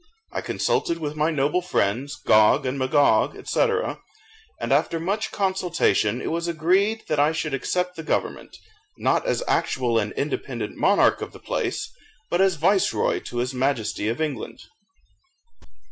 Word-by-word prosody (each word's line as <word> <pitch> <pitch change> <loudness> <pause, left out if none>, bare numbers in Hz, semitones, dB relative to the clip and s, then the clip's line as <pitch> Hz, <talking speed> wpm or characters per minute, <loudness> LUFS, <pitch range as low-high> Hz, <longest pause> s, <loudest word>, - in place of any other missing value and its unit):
I - - -3
consulted 170 - 0
with 150 -2 -4
my 155 +1 +1
noble 150 +3 +1
friends, 135 - -1
Gog 110 +6 +4
and 130 +2 -2
Magog, 140 +2 +3
&c., - - -2 1.0
and - - 0
after 165 - +1
much 200 +6 -2
consultation 180 - +1
it - - -2
was 170 +1 -2
agreed 185 +7 +1
that 150 - 0
I 145 +2 +4
should 160 -2 -3
accept 180 +6 -1
the 165 - -6
government, 160 - -3 0.4
not - - +1
as - - 0
actual 120 -3 +1
and 105 -1 -2
independent 130 -6 -3
monarch 200 +1 +3
of - - -6
the - - -12
place, - - -3 0.4
but 175 - +2
as 190 -2 +3
viceroy 185 +5 +2
to 120 - -6
his 125 +2 -1
Majesty 125 -5 -1
of 115 +2 -2
England. 155 -3 -4
155 Hz, 150 wpm, -24 LUFS, 130-180 Hz, 1.0 s, Gog